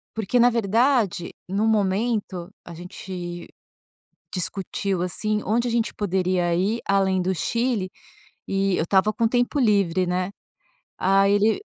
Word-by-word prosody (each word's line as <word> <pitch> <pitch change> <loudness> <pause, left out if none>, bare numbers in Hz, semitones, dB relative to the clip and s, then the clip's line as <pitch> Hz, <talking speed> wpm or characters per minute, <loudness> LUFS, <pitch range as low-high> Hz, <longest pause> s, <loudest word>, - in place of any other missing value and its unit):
Porque, 220 +2 0
na 245 +1 +6
verdade, 230 -4 +1
no 200 +4 0
momento 205 -3 0 0.2
a 170 - -9
gente 175 0 -7 0.8
discutiu, 195 0 -2
assim, 210 +4 0
onde 235 +4 +1
a - - -1
gente 230 -1 0
poderia 185 -3 0
ir 200 +6 0
além 195 -1 +2
do 185 +1 0
Chile 230 0 -1 0.6
e 195 -1 0
eu - - +1
estava 195 +4 +3
com 230 - -1
o - - +4
tempo 245 +5 0
livre, 200 -7 +2
né, 180 +1 -1 0.7
aí 195 +1 +3
ele 210 - +2
195 Hz, 140 wpm, -23 LUFS, 185-220 Hz, 0.8 s, na